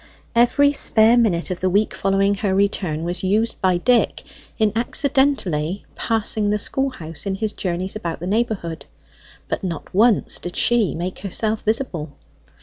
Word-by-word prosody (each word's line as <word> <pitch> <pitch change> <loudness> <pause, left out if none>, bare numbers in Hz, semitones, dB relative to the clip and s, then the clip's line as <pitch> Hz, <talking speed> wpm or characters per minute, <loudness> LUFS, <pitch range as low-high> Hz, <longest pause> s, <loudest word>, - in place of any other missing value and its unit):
Every 285 +5 +4
spare 225 -4 +4
minute 200 -7 +1
of 180 - -3
the 185 - +1
week 205 +4 +1
following 195 +1 +1
her 195 -1 -1
return 190 -5 0
was 175 +1 -3
used 215 +5 0
by 185 -2 +3
Dick 240 +6 +1 0.3
in 215 -2 +2
accidentally 230 - 0
passing 215 -2 0
the 210 - +1
schoolhouse 205 - -3
in 195 - -1
his 215 +1 -3
journeys 185 +1 -3
about 170 -6 -4
the 175 - -6
neighbourhood; 195 -6 -2 0.6
but - - -3
not 170 -5 -5
once 220 +3 +3
did 175 - -7
she 235 -6 +2
make 180 +2 -4
herself 215 +2 -2
visible. 200 - -2
200 Hz, 150 wpm, -21 LUFS, 180-225 Hz, 0.6 s, Every